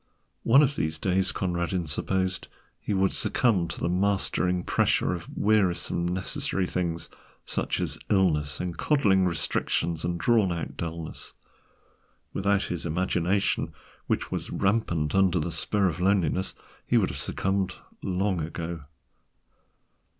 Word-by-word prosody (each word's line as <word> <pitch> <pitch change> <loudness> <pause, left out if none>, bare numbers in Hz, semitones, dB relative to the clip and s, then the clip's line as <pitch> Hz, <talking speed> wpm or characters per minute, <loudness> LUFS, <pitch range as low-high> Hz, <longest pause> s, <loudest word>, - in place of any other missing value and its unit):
One 135 +6 +6
of 140 0 +1
these 80 - -1
days 95 +3 +1
Conradin 85 -1 -1
supposed 95 +4 -1 0.3
he - - -4
would 95 -1 +2
succumb 100 -9 +2
to 85 - -6
the - - 0
mastering 90 -1 +1
pressure - - +2
of 85 -2 -6
wearisome 95 -4 +2
necessary 95 +1 -1
things—such 85 -2 -4
as - - -2
illnesses 75 -7 +2
and 90 -2 -3
coddling 100 -11 +3
restrictions 85 -1 -1
and 85 0 -1
drawn 110 -2 +3
out 85 -1 -4
dullness. 85 -1 -6 1.0
Without 100 0 +1
his 90 -2 -3
imagination, 90 +3 0 0.3
which - - -1
was - - -3
rampant 95 -7 0
under 95 -2 +3
the 85 +3 -2
spur 100 +3 +1
of 85 -3 -2
loneliness, 95 -1 +1 0.3
he - - +3
would - - +3
have - - -5
succumbed 95 -1 -1 0.3
long 95 -1 0
ago. 80 -1 -5
90 Hz, 130 wpm, -27 LUFS, 85-95 Hz, 1.0 s, One